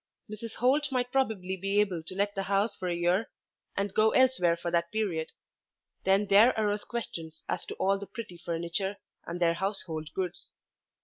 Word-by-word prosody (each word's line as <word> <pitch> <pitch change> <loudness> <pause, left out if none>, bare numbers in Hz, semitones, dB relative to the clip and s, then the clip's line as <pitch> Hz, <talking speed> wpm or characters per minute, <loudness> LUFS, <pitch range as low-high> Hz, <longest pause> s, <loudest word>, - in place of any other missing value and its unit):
Mrs. 220 +1 -6
Holt 275 +3 +2
might 250 -1 0
probably 215 -9 0
be 195 +2 +1
able 190 -5 +1
to 165 +3 -8
let 200 +1 +1
the 195 - -2
house 200 +3 +2
for 185 - -4
a 175 - 0
year 175 +5 +1 0.5
and 200 -1 -1
go 215 +2 +5
elsewhere 250 -11 +4
for 170 0 -3
that 170 0 +1
period. 185 -8 -1 0.8
Then 195 +2 +4
there 210 +5 +6
arose 210 -1 0
questions 165 -9 -6
as - - -2
to - - -6
all 195 +1 +2
the 200 - -7
pretty 195 -3 -8
furniture, 170 +4 -2 0.3
and 170 +1 -4
their 170 -1 +4
household 170 -5 -3
goods. 185 -2 -4
195 Hz, 180 wpm, -29 LUFS, 175-215 Hz, 0.8 s, there